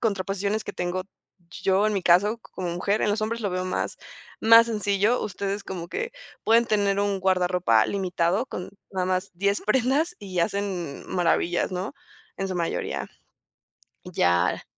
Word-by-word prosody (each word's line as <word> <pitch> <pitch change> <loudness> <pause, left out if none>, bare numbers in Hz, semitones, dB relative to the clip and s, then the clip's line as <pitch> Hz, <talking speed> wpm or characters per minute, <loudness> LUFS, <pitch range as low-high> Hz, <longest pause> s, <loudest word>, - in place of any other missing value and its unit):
contraposiciones 200 0 -1
que - - -5
tengo 180 +1 -2 0.6
yo, 195 +2 +3
en 215 - +1
mi 195 - -1
caso, 200 +7 +4
como 180 -2 -4
mujer. 200 +5 0
En 210 - +2
los 215 +1 0
hombres 230 +2 -2
lo 200 - 0
veo 185 0 -2
más 185 - -2 0.4
más 230 +1 +8
sencillo, 210 +1 +1
ustedes 200 +1 -3
como 175 -3 -6
que 475 - -4 0.3
pueden 230 +1 +5
tener 200 -2 +2
un 200 -1 0
guardarropa 180 - +3
limitado 185 +3 0
con 180 - -6 0.2
nada 185 -1 -1
más 185 +1 -1
10 200 +3 +1
prendas 270 +9 +1
y 190 -3 -5
hacen 185 -5 -2
maravillas, 175 0 +1
¿no? 185 +7 -3 0.4
En 195 0 -2
su 185 - -3
mayoría. 170 -1 -2 1.0
Ya 85 +1 +1
195 Hz, 155 wpm, -25 LUFS, 180-210 Hz, 1.0 s, más